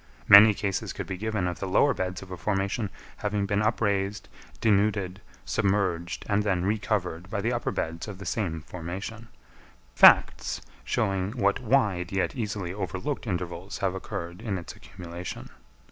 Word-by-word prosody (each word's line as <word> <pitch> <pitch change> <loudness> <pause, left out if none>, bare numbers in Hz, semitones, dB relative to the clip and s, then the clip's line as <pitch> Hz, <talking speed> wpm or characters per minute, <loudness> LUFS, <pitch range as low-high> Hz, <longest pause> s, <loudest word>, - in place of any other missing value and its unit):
Many 105 +1 +10
cases 100 -2 -2
could - - -5
be 95 - -4
given 105 -1 -2
of 90 -1 -3
the 95 - -3
lower 140 +9 +4
beds 95 0 -3
of 95 - -13
a - - -3
formation 100 +3 -1 0.3
having 105 -1 -1
been 100 +1 0
upraised, 105 -2 0 0.3
denuded, 100 -3 +1 0.2
submerged, 95 -4 0
and 105 0 +2
then 95 -4 0
re 105 +2 +1
covered 90 -4 -2
by 105 - -2
the 115 +4 0
upper 120 - -1
beds 80 +3 -3
of 100 -3 -7
the 100 - -9
same 85 -8 -2
formation—facts, 90 - +1 0.2
showing 95 - 0
what 100 -5 +1
wide, 105 -8 +1
yet 95 +6 0
easily 105 -7 -3
overlooked, 95 - -4
intervals 90 0 -4
have 95 -2 0
occurred 90 -1 -6
in 105 -5 -2
its 85 - -8
accumulation. 90 0 -8
100 Hz, 155 wpm, -27 LUFS, 90-105 Hz, 0.3 s, Many